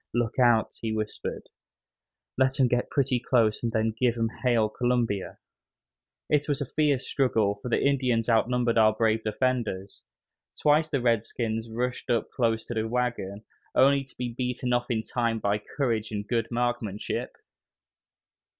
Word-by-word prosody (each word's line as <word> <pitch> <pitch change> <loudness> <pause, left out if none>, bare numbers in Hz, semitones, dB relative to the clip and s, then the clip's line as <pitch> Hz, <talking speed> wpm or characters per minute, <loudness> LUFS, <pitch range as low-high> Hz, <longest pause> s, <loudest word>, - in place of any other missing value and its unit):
"Look 120 +1 0
out," 120 -3 +4
he 115 - -2
whispered, 110 -1 -4 0.8
"let 130 +1 +1
'em 130 - +5
get 125 0 0
pretty 135 -3 +1
close 115 -3 +2
and 115 - -1
then 110 0 0
give 120 -2 +2
'em 115 -1 0
hail 120 -4 +3
Columbia." 120 -4 -1 0.9
It 150 0 +1
was 145 - 0
a 140 - -2
fierce 145 -1 0
struggle, 110 -7 +1
for 125 - -5
the - - +1
Indians 125 -5 +1
outnumbered 120 0 +2
our 110 0 +5
brave 110 0 +1
defenders. 110 -4 -2 0.5
Twice 155 +1 +3
the 140 -4 0
redskins 115 -1 -1
rushed 125 +2 -3
up 115 -2 0
close 115 -3 0
to - - -5
the 110 -1 -1
wagon, 115 -4 -2 0.3
only 140 +1 +5
to 135 - -14
be 125 -1 -3
beaten 125 0 -2
off 120 +1 0
in 110 -2 0
time 115 -1 -1
by 105 -1 0
courage 115 -2 -2
and 105 -1 -4
good 115 -2 0
marksmanship. 120 -4 -2
120 Hz, 155 wpm, -27 LUFS, 110-125 Hz, 0.9 s, em